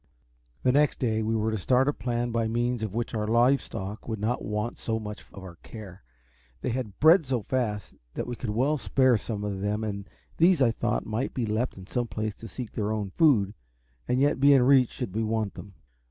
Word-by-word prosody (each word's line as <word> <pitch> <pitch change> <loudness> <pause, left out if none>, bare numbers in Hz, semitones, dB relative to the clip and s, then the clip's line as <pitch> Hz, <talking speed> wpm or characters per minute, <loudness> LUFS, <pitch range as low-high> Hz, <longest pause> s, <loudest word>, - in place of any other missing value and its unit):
The 125 - +4
next 145 +2 +3
day 110 -3 0
we 110 +1 0
were 110 0 0
to 110 - -2
start 130 +7 +3
a 145 - +2
plan 120 -2 -2
by 115 -1 0
means 120 +1 -1
of 110 -2 -4
which 120 +1 -2
our 105 -1 -1
live 120 +5 +4
stock 100 +3 -7
would 110 -1 -2
not 115 +4 -1
want 105 +2 -3
so 110 -1 -2
much 105 -1 -7
of 100 - -10
our 90 -2 -10
care. 100 -5 -10 0.6
They - - -1
had 115 -5 -4
bred 160 +3 +7
so 125 -5 -2
fast 110 -5 -2 0.2
that - - -2
we 120 - -4
could 120 - -5
well 135 +8 +1
spare 130 -2 +3
some 105 -1 -4
of 100 -2 -3
them, 105 +2 -1
and 100 -2 -4 0.3
these 175 0 +5
I 125 -4 +4
thought - - -1
might 110 +4 -3
be 125 - 0
left 110 +3 -1
in 95 - -10
some 120 +4 -2
place 110 -1 -3
to 115 - -9
seek 120 0 -7
their 105 -1 -2
own 105 -3 -2
food, 105 - +3 0.5
and 125 - +1
yet 140 0 +2
be 140 +1 +6
in 130 - +5
reach 130 -2 +5
should 110 -7 -6
we 110 - +1
want 110 -2 -1
them. 100 -2 -11
115 Hz, 225 wpm, -27 LUFS, 105-125 Hz, 0.6 s, bred